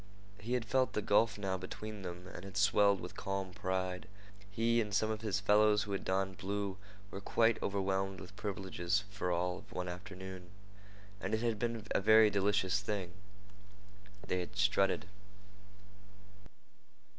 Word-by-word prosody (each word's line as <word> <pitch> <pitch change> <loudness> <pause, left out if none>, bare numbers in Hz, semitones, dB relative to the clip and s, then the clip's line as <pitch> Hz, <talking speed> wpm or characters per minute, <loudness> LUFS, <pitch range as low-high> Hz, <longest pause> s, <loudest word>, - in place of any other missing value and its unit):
He 115 +4 -3
had 125 -2 0
felt 130 +2 +2
the 105 - 0
gulf 105 +1 +3
now 95 -2 -1
between 105 +3 -6
them 90 -1 -7
and 85 - -8
had 100 0 -7
swelled 100 0 +4
with 90 - -7
calm 95 -1 -3
pride. 95 -1 -2 0.4
He 115 +3 +2
and 105 -2 -3
some 110 +2 +2
of 110 0 -3
his 105 -3 0
fellows 105 +1 +4
who 105 - -6
had 100 - -2
donned 95 -1 -1
blue 100 0 -2 0.3
were 95 - -6
quite 115 +2 +2
overwhelmed 95 -1 -1
with 100 - -11
privileges 95 -1 -1
for 95 -3 -2
all 90 +1 0
of - - -17
one 90 0 -3
afternoon, 90 0 -8 0.7
and 110 - -1
it 110 - -2
had 115 -3 0
been 115 -2 -2
a - - +2
very 110 +1 +7
delicious 100 -1 +2
thing. 100 -3 -3 1.2
They 90 - 0
had 90 - -5
strutted. 100 -2 +2
100 Hz, 155 wpm, -34 LUFS, 95-105 Hz, 1.2 s, very